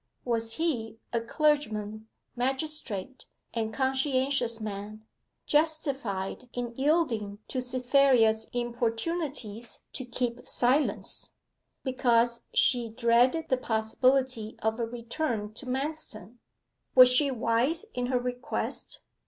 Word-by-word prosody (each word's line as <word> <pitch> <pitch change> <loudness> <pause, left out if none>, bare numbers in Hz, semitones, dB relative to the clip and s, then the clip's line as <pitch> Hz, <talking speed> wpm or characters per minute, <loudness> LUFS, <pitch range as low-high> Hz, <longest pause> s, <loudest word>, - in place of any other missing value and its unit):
Was 230 -2 -1
he 225 -8 -1 0.2
a 235 - +1
clergyman, 225 -6 0 0.3
magistrate, 265 -3 -3 0.3
and 225 -2 -1
conscientious 265 -2 +1
man 215 0 -6 0.4
justified 270 -9 0
in 240 -1 -3
yielding 265 -8 +1
to 255 - -1
Cytherea's 250 -3 +3
importunities 240 0 -2
to 260 - -4
keep 245 0 -3
silence, 265 +4 +1 0.5
because 240 -3 +2
she 240 -3 +3
dreaded 245 +7 +3
the 260 - +3
possibility 240 0 +1
of 220 +2 0
a 230 - +1
return 235 -2 -3
to 255 - -10
Manston? 250 - -4 0.6
Was 255 -1 +10
she 275 +3 +4
wise 250 - +1
in 245 0 -1
her 255 0 +2
request? 250 0 -4
245 Hz, 105 wpm, -29 LUFS, 225-270 Hz, 0.6 s, Was